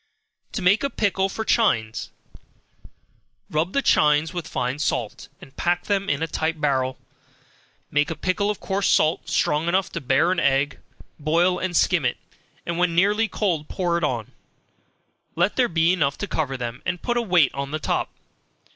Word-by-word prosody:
To 195 - -3
Make 200 +7 +4
a 280 - +1
Pickle 195 -5 0
for 220 +3 -4
Chines. 115 - +1 1.4
Rub 160 +4 0
the 275 - +1
chines 150 +2 +3
with 175 -2 -4
fine 125 +3 -2
salt, 150 - -2
and 135 - -15
pack 175 0 0
them 200 -1 -1
in - - 0
a - - -1
tight 160 0 -2
barrel, 130 -3 0 0.9
make 145 0 +2
a 165 - -3
pickle 190 +6 0
of 210 - -2
coarse 195 0 -1
salt, 155 +2 +2
strong 150 +3 +1
enough 185 +1 +1
to 170 - -4
bear 140 +6 +2
an 185 - +1
egg, 140 +1 +1 0.4
boil 170 +4 +2
and 185 -2 -1
skim 175 -5 +3
it, 125 - 0 0.5
and 170 0 -3
when 175 -2 +1
nearly 205 +5 +3
cold 170 -9 -2
pour 175 -3 -1
it 170 - -1
on, 120 -7 -2 1.0
let 175 +5 +1
there 250 -2 +2
be 165 +1 +3
enough 140 -6 0
to 205 - -4
cover 145 -7 -2
them, 120 0 -5
and 180 -2 -3
put 240 - 0
a 240 - +2
weight 180 - +3
on 140 0 -4
the 155 - -2
top. 155 - -1
170 Hz, 180 wpm, -23 LUFS, 145-190 Hz, 1.4 s, Make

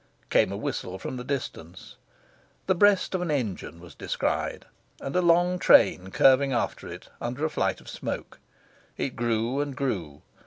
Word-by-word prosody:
Came - - +4
a - - -3
whistle 90 +1 -4
from 125 - -6
the 125 - -5
distance. 120 - -6 0.7
The 190 - +3
breast 195 +1 +3
of 185 - 0
an 180 - -2
engine 110 - -3
was 85 0 -13
descried, - - -2 0.3
and 135 - -5
a 180 - +4
long 175 +1 +3
train 95 - +5
curving 135 +6 +4
after 120 - -2
it, - - -10
under 125 +6 -2
a 160 - -1
flight - - 0
of - - -18
smoke. - - -6 0.6
It 130 - -3
grew 120 +2 0
and 145 -2 -2
grew. 85 - -3
130 Hz, 165 wpm, -26 LUFS, 105-160 Hz, 0.7 s, train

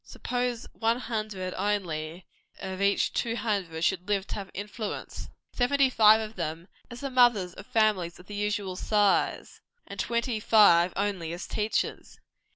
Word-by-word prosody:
Suppose 245 -1 -3
one 230 +1 +1
hundred 215 -6 -4
only 180 -4 -3 0.3
of 190 0 -5
each 200 0 +2
two 230 -1 -1
hundred, 200 -8 -2
should 180 +1 0
live 200 -2 0
to - - -7
have 195 -2 -5
influence, 205 +2 -6 0.2
seventy 265 +1 +2
five 220 -2 +6
of 220 0 -6
them 165 0 -4 0.2
as 240 0 -9
the 275 -1 -4
mothers 240 -8 +4
of 195 - -12
families 210 -6 +1
of 180 - -15
the 205 - -10
usual 205 -2 -2
size, 205 +1 +1 0.2
and - - -10
twenty 235 -1 -1
five 200 -5 +5
only, 195 -4 -2
as 175 - -6
teachers. 215 +1 -2
205 Hz, 155 wpm, -28 LUFS, 185-225 Hz, 0.3 s, five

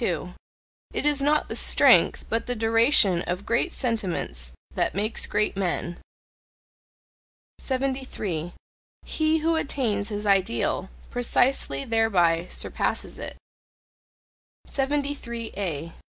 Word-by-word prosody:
It - - -1
is 295 -2 +3
not 300 +2 +2
the - - -5
strength, - - +5
but 225 +2 -2
the 245 - -1
duration 225 -4 +5
of 180 +3 -3
great 230 +1 +1
sentiments 180 - -3 0.2
that - - -1
makes 210 +3 -1
great 210 0 0
men. 175 -2 -2 1.6
73. 255 - -3 0.5
He 315 0 +1
who 325 +1 +1
attains 230 -9 -1
his 210 0 -4
ideal, 190 - +1 0.2
precisely 245 - +1
thereby 180 -7 +2
surpasses - - -3
it. - - -7 1.3
73A. 235 - -3
225 Hz, 95 wpm, -25 LUFS, 180-265 Hz, 1.6 s, strength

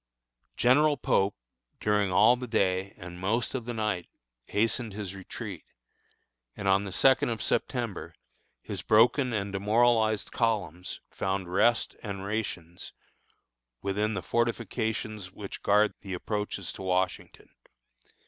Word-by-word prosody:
General 145 +5 +4
Pope, 100 +1 +2 0.4
during 105 -2 +2
all 120 +6 +6
the 125 0 -6
day, 95 -3 0
and 90 0 -9
most 110 +6 0
of 125 -4 -3
the 120 - -3
night, 105 -5 -1 0.4
hastened 110 +1 0
his 100 -2 -5
retreat, 95 -2 -7 0.9
and 100 - -3
on 95 +1 +4
the 100 - -5
second 130 +5 +4
of 115 -2 -2
September, 115 0 -2 0.5
his - - -5
broken 120 +4 +4
and 100 -3 -2
demoralized 110 +1 +2
columns 95 -7 -1
found 95 -2 -2
rest 115 +5 +3
and 100 -2 -5
rations 90 -5 -4 0.9
within 105 +2 0
the 90 - -3
fortifications 110 -3 -1
which 100 0 -8
guard 105 +1 +4
the 95 -2 -5
approaches 105 0 -3
to - - -10
Washington. 95 0 -2
105 Hz, 125 wpm, -29 LUFS, 95-115 Hz, 0.9 s, all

